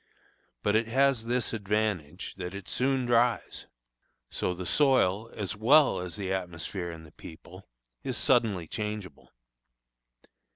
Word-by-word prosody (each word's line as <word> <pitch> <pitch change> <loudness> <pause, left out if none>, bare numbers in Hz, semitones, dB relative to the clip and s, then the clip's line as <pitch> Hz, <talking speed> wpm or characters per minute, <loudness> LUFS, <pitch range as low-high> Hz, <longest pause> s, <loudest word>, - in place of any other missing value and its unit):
But 105 - +2
it 115 +1 +2
has 130 -1 +2
this 120 0 0
advantage, 100 -6 -2
that 90 0 -5
it 100 -2 -8
soon 130 0 +1
dries. 120 0 +1 0.6
So 90 - -1
the 90 +1 -6
soil, 115 - +3
as 105 -1 -3
well 135 +8 +5
as 90 -1 -5
the 95 -2 -2
atmosphere 90 0 -4
and 80 -1 -9
the 75 - -15
people, 80 - -13 0.4
is - - -2
suddenly 110 -9 +2
changeable. 105 -2 -6
105 Hz, 130 wpm, -29 LUFS, 90-120 Hz, 0.6 s, well